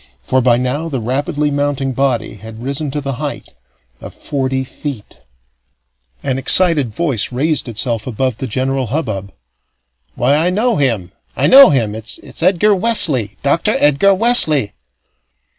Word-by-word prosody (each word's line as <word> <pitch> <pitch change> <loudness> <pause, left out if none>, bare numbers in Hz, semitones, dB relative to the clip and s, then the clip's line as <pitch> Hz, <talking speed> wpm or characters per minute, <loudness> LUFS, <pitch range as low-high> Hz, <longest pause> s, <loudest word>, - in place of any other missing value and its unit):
For 130 0 +1
by 120 -1 +3
now 135 +6 -2
the 135 -4 -3
rapidly 145 +5 -2
mounting 140 -1 -1
body 125 -4 -1
had 110 +3 -11
risen 140 +3 -3
to 145 +2 -4
the 135 -3 -5
height - - -6 0.5
of - - -11
forty 130 -1 -3
feet. 130 -3 -8 1.0
An 135 -1 -2
excited 150 -3 +3
voice 135 -5 -1
raised 145 +3 0
itself 115 +1 -3
above 130 0 -2
the 130 - -4
general 130 +2 -2
hubbub. 105 -8 -4 0.8
"Why, 125 +3 +1
I 165 +4 +1
know 220 +5 0
him! 115 -11 -1 0.2
I - - 0
know 275 +1 +8
him! 115 -7 0
It's 110 +7 -5
Edgar 190 +4 +3
Wesley! 165 - +2
Doctor 140 +4 +1
Edgar 150 +7 +3
Wesley!" 160 - +3
135 Hz, 140 wpm, -16 LUFS, 120-155 Hz, 1.0 s, know